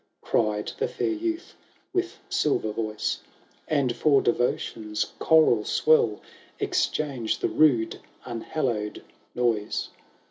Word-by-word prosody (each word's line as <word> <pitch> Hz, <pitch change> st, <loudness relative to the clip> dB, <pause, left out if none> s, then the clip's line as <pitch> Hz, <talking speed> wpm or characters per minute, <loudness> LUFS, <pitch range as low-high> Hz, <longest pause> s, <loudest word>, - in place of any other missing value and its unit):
Cried 105 Hz, -2 st, 0 dB
the -, -, +1 dB
fair -, -, -1 dB
youth 335 Hz, +2 st, -3 dB, 0.4 s
with 365 Hz, -1 st, -1 dB
silver 150 Hz, -, +1 dB
voice; 105 Hz, -1 st, -2 dB, 0.2 s
" -, -, -34 dB
And 140 Hz, -6 st, +1 dB
for 140 Hz, +2 st, +4 dB
Devotion's 110 Hz, -3 st, -1 dB
choral 155 Hz, -9 st, +5 dB
swell, 115 Hz, -5 st, +3 dB, 0.4 s
Exchange 135 Hz, -7 st, 0 dB
the -, -, 0 dB
rude 125 Hz, -8 st, +3 dB, 0.3 s
unhallowed 115 Hz, -3 st, -3 dB, 0.3 s
noise. 115 Hz, -4 st, 0 dB
120 Hz, 105 wpm, -26 LUFS, 110-155 Hz, 0.4 s, choral